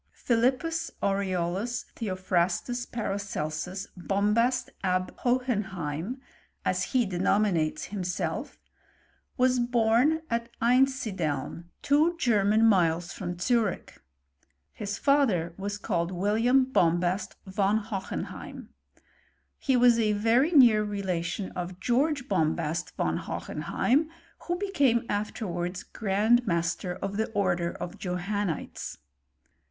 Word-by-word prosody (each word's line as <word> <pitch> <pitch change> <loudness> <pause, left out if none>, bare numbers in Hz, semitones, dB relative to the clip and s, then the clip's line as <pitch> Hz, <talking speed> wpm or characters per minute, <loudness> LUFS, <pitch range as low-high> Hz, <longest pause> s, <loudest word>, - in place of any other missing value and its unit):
Philippus 260 +8 +1
Aureolus 195 +3 -1
Theophrastus 190 +3 -1
Paracelsus 195 -4 -3
Bom 200 +3 0
hast 245 +2 +1
ab 185 -1 0
Hohenheim 210 - -1 0.5
(as - - +1
he 255 -3 +1
denominates 185 -3 +1
himself) 180 -3 -3 0.8
was 255 -1 +3
hora 245 +7 +3
at 235 -2 -2
Einsideln, 220 - +1 0.2
two 310 +5 +3
German 215 -4 +3
miles 175 -5 +3
from 175 -2 -5
Zurich. 225 +2 -1 0.8
Higfether 205 - +1
was 205 +1 -3
called 170 -3 -1
William 225 +8 +3
Bombast 175 -5 +1
von 200 +2 +1
Hohenheim. 205 -3 -6 0.9
He 265 -2 +2
was 240 -1 +5
a 215 -2 +2
very 230 +8 +3
near 240 -9 +6
relation 190 -2 -3
of 180 0 -6
George 265 +5 +1
Bombast 160 - -1
von - - 0
Hohenheim, 295 +6 -1 0.4
who 350 0 0
became 285 - +2
afterwards 185 -3 -3
grand 220 +3 +1
master 170 0 -1
of 200 +2 -4
the 220 - 0
order 175 -4 +1
of 175 - -7
Johannites. 180 -1 -3
205 Hz, 100 wpm, -28 LUFS, 180-245 Hz, 0.9 s, near